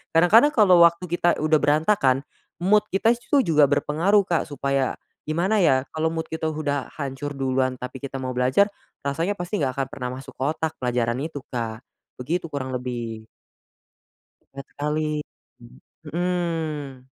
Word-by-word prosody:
Kadang-kadang 215 - +6
kalau 185 -6 +6
waktu 170 +2 +2
kita 175 0 +2
udah 155 0 +2
berantakan, 145 -3 +2 0.4
mood 210 +3 +5
kita 210 +5 +3
itu 250 +3 +1
juga 150 -4 +5
berpengaruh 160 +8 +2
Kak, 170 -4 -1
supaya, 140 -1 -1 0.3
gimana 185 +6 +1
ya 130 -5 +3
kalau 160 +1 0
mood 160 0 -3
kita 160 0 -3
udah 145 -3 -2
hancur 140 0 -4
duluan, 130 -1 0
tapi 125 +1 -7
kita 140 -1 -5
mau 130 -1 -4
belajar, 130 +10 +3 0.4
rasanya 165 +8 -1
pasti 175 0 -3
enggak 130 -1 -1
akan 135 - 0
pernah 125 -2 -4
masuk 135 - -11
ke - - -14
otak 160 0 -2
pelajaran 120 -1 0
itu, 145 -3 -6
Kak. 115 0 -4 0.3
Begitu 165 +6 -3
kurang 130 -3 -4
lebih. 120 -3 -5 1.3
Ngakalin. 150 +2 -3 0.8
Mhm. 160 -6 -3
150 Hz, 145 wpm, -24 LUFS, 130-170 Hz, 1.3 s, Kadang-kadang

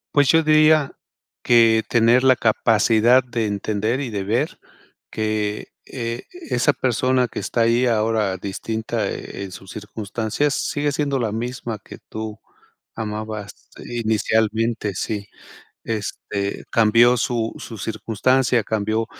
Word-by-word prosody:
Pues, 145 -1 +5
yo 160 0 +5
diría 155 -1 +4 0.5
que 115 -2 +5
tener 120 +2 +4
la 130 -1 +6
capacidad 115 +2 +3
de 115 -3 -2
entender 105 +4 -1
y 130 -5 -4
de 100 -2 -3
ver 120 +10 -1 0.5
que, 110 -1 -2 0.2
eh, 115 -2 -5
esa 305 - 0
persona 130 0 +1
que - - -6
está 115 - -1
ahí 120 +2 +3
ahora 110 -4 +1
distinta 110 +4 -3
en 100 -1 -7
sus 95 0 -11
circunstancias 110 +6 -2
sigue 145 +1 -1
siendo 140 -1 -1
la 115 -4 -1
misma 115 0 -4
que - - -11
tú 110 -1 -6 0.6
amabas 110 -1 -6 0.2
inicialmente 110 -1 0
sí. 100 +2 -3 0.6
Este, 100 -2 -3
cambió 115 +2 +5
su 115 0 -1
su 115 - -8
circunstancia, 115 +4 +1
cambió 110 +1 -1
115 Hz, 120 wpm, -21 LUFS, 110-125 Hz, 0.6 s, la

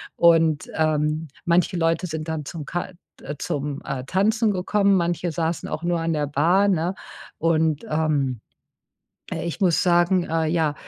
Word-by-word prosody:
und, 165 -3 +3
ähm, 155 0 0 0.2
manche 175 +2 +2
Leute 165 +2 +1
sind 155 -1 -5
dann 160 -2 -3
zum 155 0 -7
Ka 175 +5 -4 0.5
zum, 145 0 -3
äh, 130 -2 -4
Tanzen 215 - +2
gekommen. 200 +1 +2
Manche 175 -1 0
saßen 165 +1 -2
auch 160 - -4
nur 175 0 0
an 165 0 -1
der 150 -1 -1
Bar, 170 +8 +3
ne? 180 0 0 0.4
Und, 160 -2 +1
ähm, 145 -6 0 0.9
äh, - - -3
ich 170 +4 -4
muss 180 -4 +3
sagen, 175 +1 +3
äh, 160 -1 0
ja, 155 -2 +1
165 Hz, 155 wpm, -23 LUFS, 155-175 Hz, 0.9 s, und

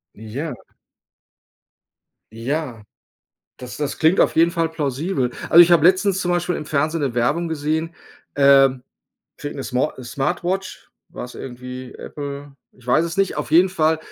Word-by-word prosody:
Ja. 120 +9 -6 1.8
Ja. 120 0 -4 0.8
Das 125 -1 -9
das 145 -2 -3
klingt 165 +4 +3
auf - - +3
jeden 165 +1 +5
Fall 165 -2 0
plausibel. 145 -2 -2 0.2
Also, 170 - +9
ich 175 0 +5
habe 165 -1 +5
letztens 190 +1 +3
zum 175 -1 -1
Beispiel 175 0 0
im 150 - -5
Fernsehen 155 +2 -1
'ne 135 -4 -1
Werbung 150 +9 0
gesehen. 160 +1 -2 0.4
Ähm. 135 -2 +5 0.6
Kriegt 145 0 -6
'ne 135 - -5
Smo 130 +3 -1
Smartwatch, 175 +9 -3 0.2
war's 125 - -8
irgendwie 125 0 -8
Apple, 140 -1 -8 0.2
ich 125 -1 -22
weiß 155 +7 +3
es 170 0 -5
nicht. 195 -1 +1
Auf - - -4
jeden 175 +4 +5
Fall, 160 -3 +1
150 Hz, 150 wpm, -21 LUFS, 130-170 Hz, 1.8 s, Also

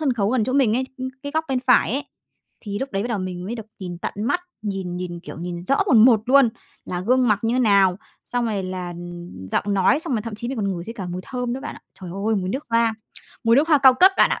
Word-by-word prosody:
sân 290 -4 +1
khấu 210 -4 0
gần 245 -3 +2
chỗ 255 - -2
mình 255 -5 +3
ấy, 260 - 0
ưm, 260 0 -4
cái 285 0 -5
góc 315 0 0
bên 260 -2 0
phải 250 -3 +3
ấy, 280 - -1 0.6
thì 205 -2 -5
lúc 270 -4 -5
đấy 195 - -1
bắt 235 - -3
đầu 230 -4 -1
mình 180 -1 -5
mới 215 +5 -4
được 225 -3 -8
nhìn 180 -3 -6
tận - - -4
mắt, 230 - 0 0.2
nhìn 190 -4 -4
nhìn, 175 -1 -5
kiểu, 175 - -9
nhìn 175 0 -5
rõ 275 - +2
mồn 230 - +6
một 230 -4 +5
luôn, 270 -1 +6 0.4
là 180 - -4
gương 250 +5 +2
mặc 210 -1 +3
như 225 +1 +1
thế - - +1
nào, 200 -6 +4 0.3
xong 245 -1 -1
rồi 210 -4 -1
là, 185 -1 -4
ừm, 175 - -9
giọng - - 0
nói, 195 +9 +3
xong 295 - -4
rồi 215 - -1
thậm 225 -1 -6
chí 235 +3 -5
mình 265 - -4
còn 200 -2 -1
ngửi 170 - -6
thấy 230 - -7
cả 190 -5 -6
mùi 180 +1 -4
thơm 250 -2 -3
nữa 260 - -4
bạn 290 - -6
ạ. - - -13 0.2
Trời 180 -2 -7 0.2
ơi! 220 - +2
Mùi 185 -2 -2
nước 265 +9 -3
hoa, 230 -1 +2 0.5
mùi 230 +2 +5
nước 300 +3 +3
hoa 305 -3 +5
cao 265 -1 +7
cấp 370 +9 +6
bạn - - +5
ạ. - - -1
225 Hz, 290 wpm, -22 LUFS, 185-255 Hz, 0.6 s, cao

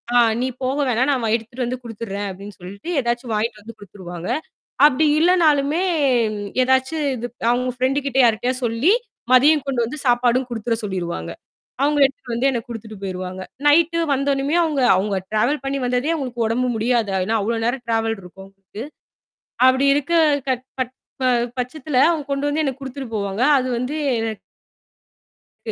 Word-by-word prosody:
ஆ - - +7 0.2
"நீ 255 - 0
போக 260 +2 -1
வேணாம், 250 +3 +1
நான் 265 -3 0
வ - - 0
எடுத்துட்டு 235 +2 -4
வந்து 250 +1 -3
குடுத்துடுறேன்." 205 -3 -5
அப்படின்னு 195 +2 -9
சொல்ட்டு 200 - -9
ஏதாச்சும் 240 -1 -2
வாங்கிட்டு 215 0 -2
வந்து 225 +2 -11
குடுத்துருவாங்க. 180 -3 -8 0.6
அப்படி 300 +2 +3
இல்லனாலுமே 320 -2 +3 0.8
ஏதாச்சு 260 +4 +2 0.2
இது 240 +1 -4 0.2
அவுங்க 250 +1 +1
ஃப்ரெண்ட் 260 +2 +1
கிட்ட 270 -1 -1
யார்ட்டயாவது 245 +3 +1
சொல்லி, 235 - +2 0.4
மதியம் 285 +3 +5
கொண்டு 265 -3 -1
வந்து 255 +7 -5
சாப்பாடும் 245 +1 +3
குடுத்துர 230 0 -2
சொல்லிருவாங்க. 170 - -4 0.5
அவங்க 295 +1 +2
எடுத்து 265 -2 -9
வந்து 240 +4 +1
எனக்கு 245 -1 -4
குடுத்துட்டு 220 -2 -8
போயிருவாங்க. 185 -1 -5 0.2
நைட்டு 335 +3 +4
வந்த 275 0 0
உடனுமே 275 +4 0
அவுங்க 300 -4 -1 0.2
அவுங்க 195 +1 0
ட்ராவல் 240 +7 +1
பண்ணி 275 +1 -1
வந்ததே 250 +4 0
அவுங்களுக்கு 250 -6 -3
உடம்பு 245 +3 0
முடியாது. 230 0 +1 0.2
ஏனா 225 +4 0
அவ்ளோ 230 +3 -1
நேரம் 245 +2 -1
ட்ராவல் 225 -1 0
இருக்கும் 190 +2 -13 0.2
க்கு. 210 - -7 0.9
அப்படி 260 +1 +3
இருக்க 290 +3 -1 0.3
க - - +2 0.3
ப் 255 0 -2 0.3
ப - - +1 0.3
பட்சத்தில 260 +2 -3
அவங்க 320 -3 -2
கொண்டு 280 +1 -1
வந்து 295 +2 0
எனக்கு 270 -2 -2
குடுத்துட்டு 265 -1 -6
போவாங்க. 200 +1 -2 0.2
அது 255 -1 -1
வந்து 250 +5 -3 0.2
எனக் 225 -2 -3 1.3
க - - -1
245 Hz, 160 wpm, -21 LUFS, 220-275 Hz, 1.3 s, ஆ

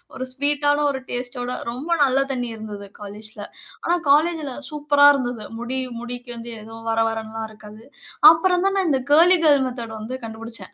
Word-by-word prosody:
ஒரு 260 - -4
ஸ்வீட்டான 290 +1 +1
ஒரு 265 - -4
டேஸ்டோட, 245 0 -4 0.2
ரொம்ப 265 +8 -5
நல்ல 270 -1 +4
தண்ணீ 250 -2 -2
இருந்தது, 210 -2 -8
காலேஜ்ல. 210 +2 -7 0.4
ஆனா, 345 - +2
காலேஜ்ல 305 0 +3 0.2
சூப்பரா 290 -1 +3
இருந்தது. 245 -5 -3 0.2
முடி 245 +2 -4 0.2
முடிக்கு 245 +1 -7
வந்து 235 0 -8
எதுவும், 225 +1 -11
வர 225 0 +1
வரன்னுலாம் 225 0 -4
இருக்காது. 215 0 -13 0.5
அப்புறம் 360 +2 +2
தான் 390 0 +1
நான் 380 -2 +1
இந்த 270 -3 +2
கர்லி 345 +5 +7
கேர்ள் 290 -3 +5
மெத்தட் 235 -3 -6
வந்து 225 +4 -5
கண்டுபிடிச்சேன். 225 -3 -7
245 Hz, 160 wpm, -22 LUFS, 225-290 Hz, 0.5 s, கர்லி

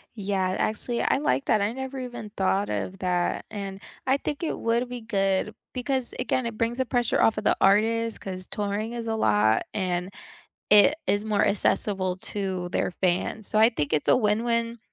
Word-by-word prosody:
Yeah. 190 -3 -1
Actually, 225 +3 -1
I - - +3
like 275 -1 0
that, 215 - +2
I 205 +2 +1
never 265 +2 -5
even 240 -4 -7
thought 195 +1 +1
of 190 - -3
that. 180 -1 0
And 195 -1 -6 0.3
I 265 +1 +4
think 295 +3 -4
it - - -1
would 235 +2 0
be 245 -1 -6
good 195 -1 0 0.2
because, 255 0 -2
again, 255 0 0
it 230 -2 -4
brings 230 +2 0
the 260 - 0
pressure 240 0 +1
off 220 - +4
of 215 - -2
the - - +3
artist 225 +3 +3
'cause 185 -1 -7
touring 210 +3 -3
is 235 -1 -5
a 225 - 0
lot, 110 - +3
and 180 -2 -1 0.6
it 210 +7 +7
is 205 +1 +2
more 215 -2 +2
accessible 190 -2 0
to 190 -2 -4
their 180 - -1
fans. 185 +4 -1
So 215 - +1
I 220 +1 +7
think 150 - -2
it's 150 - 0
a - - +6
win-win 230 +1 0
215 Hz, 190 wpm, -26 LUFS, 190-235 Hz, 0.6 s, it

